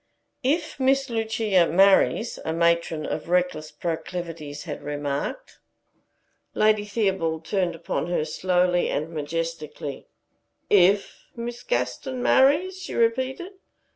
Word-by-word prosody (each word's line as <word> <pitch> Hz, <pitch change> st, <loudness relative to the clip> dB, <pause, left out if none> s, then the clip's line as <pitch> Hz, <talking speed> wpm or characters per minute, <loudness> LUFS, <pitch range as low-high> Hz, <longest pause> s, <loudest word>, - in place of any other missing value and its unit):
"If 305 Hz, +3 st, -1 dB
Miss 270 Hz, 0 st, +2 dB
Lucia 220 Hz, -5 st, +2 dB
marries" 195 Hz, +5 st, +3 dB
a 160 Hz, -, -2 dB
matron 170 Hz, -2 st, +1 dB
of 155 Hz, -, -4 dB
reckless 180 Hz, -4 st, 0 dB
proclivities 165 Hz, -3 st, -5 dB
had 150 Hz, -4 st, -6 dB
remarked. 145 Hz, -, -4 dB, 1.0 s
Lady 215 Hz, -1 st, +3 dB
Theobald 190 Hz, -7 st, -1 dB
turned 180 Hz, -3 st, 0 dB
upon 165 Hz, 0 st, -3 dB
her, 175 Hz, -3 st, 0 dB
slowly 180 Hz, +2 st, +1 dB
and 155 Hz, +3 st, -2 dB
majestically. 155 Hz, -2 st, -5 dB, 0.6 s
"If 200 Hz, +1 st, +3 dB
Miss 240 Hz, 0 st, -5 dB
Gaston 245 Hz, -, -2 dB
marries," 310 Hz, +10 st, +3 dB
she -, -, -6 dB
repeated. 260 Hz, +9 st, 0 dB
180 Hz, 110 wpm, -25 LUFS, 160-235 Hz, 1.0 s, marries